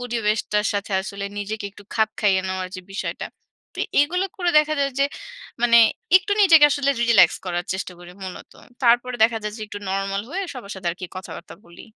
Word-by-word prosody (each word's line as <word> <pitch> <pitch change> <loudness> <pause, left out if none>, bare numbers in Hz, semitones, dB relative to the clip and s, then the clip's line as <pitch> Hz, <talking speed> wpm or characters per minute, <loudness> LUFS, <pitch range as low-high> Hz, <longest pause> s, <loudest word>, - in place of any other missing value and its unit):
পরিবেশটার 215 -3 -1
সাথে 200 0 -3
আসলে 200 +1 -6
নিজেকে 210 +1 -4
একটু 205 - -15
খাপ 220 -1 +2
খাইয়ে 195 -3 +3
নেওয়ার 185 -1 -3
যে 185 - -7
বিষয়টা। 195 - -4 0.5
তো - - -12 0.2
এগুলো 360 +6 +1
করে 355 -2 0
দেখা 305 0 +1
যায় 275 - +1
যে 275 - +4 0.6
মানে 235 -1 +5 0.4
একটু 375 +2 0
নিজেকে 330 -7 +7
আসলে 280 0 +1
রিল্যাক্স 225 -7 +5
করার 175 0 -2
চেষ্টা 190 -1 -5
করি 175 0 -12
মূলত। 185 -1 -9 0.3
তারপরে 245 +1 +3
দেখা 225 0 +4
যায় 210 0 -4
যে - - -11
একটু 205 0 -7
নরমাল 195 +1 -2
হয়ে 390 +2 -3
সবার 230 -6 -8
সাথে 185 -2 -8
আরকি 180 +1 -7
কথা-বার্তা 185 - -9
বলি। 170 - -14
210 Hz, 185 wpm, -22 LUFS, 195-250 Hz, 0.6 s, নিজেকে